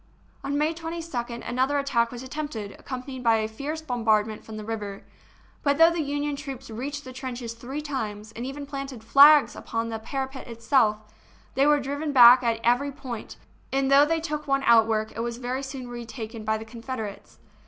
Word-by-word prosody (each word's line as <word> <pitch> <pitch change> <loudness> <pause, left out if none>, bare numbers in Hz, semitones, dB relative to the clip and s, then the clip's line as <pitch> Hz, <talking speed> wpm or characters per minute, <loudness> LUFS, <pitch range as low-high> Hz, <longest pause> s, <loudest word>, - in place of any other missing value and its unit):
On 280 +1 -1
May 305 +2 +1
22d 325 -8 -5
another 260 +4 +1
attack 260 -5 +1
was 245 0 -7
attempted, 260 -7 -5
ac - - -15
companied 255 -1 -6
by 230 -1 +5
a 215 -1 0
fierce 290 +8 -5
bombardment 220 -5 +1
from 220 -1 -9
the 215 - -7
river; 205 -3 -5 0.6
but 285 -2 +2
though 330 +1 +7
the 335 -1 -1
Union 290 0 -2
troops 270 -3 -8
reached 280 +6 -5
the 255 - -9
trenches 250 -3 -5
three 255 +6 -6
times, 220 -7 -4
and 230 +1 -7
even 275 +2 -5
planted 275 -4 -6
flags 285 +5 +7
upon 230 0 -3
the 225 -1 -4
para 265 +4 -3
pet 265 0 -10
itself, 230 -1 +2 0.6
they 275 +2 +3
were 295 0 +5
driven 285 +3 -3
back 250 -1 +9
at 230 -2 0
every 245 +4 +2
point, 260 -5 -7 0.3
and 270 0 +1
though 280 +1 +8
they 330 +1 +1
took 300 -2 -4
one 275 0 +1
outwork, 220 -2 +4
it - - -5
was 235 0 -3
very 255 +2 -3
soon 265 -2 -6
retaken 230 -2 -7
by 220 0 0
the 220 - -8
Confederates. 230 -2 -7
255 Hz, 190 wpm, -26 LUFS, 230-285 Hz, 0.6 s, back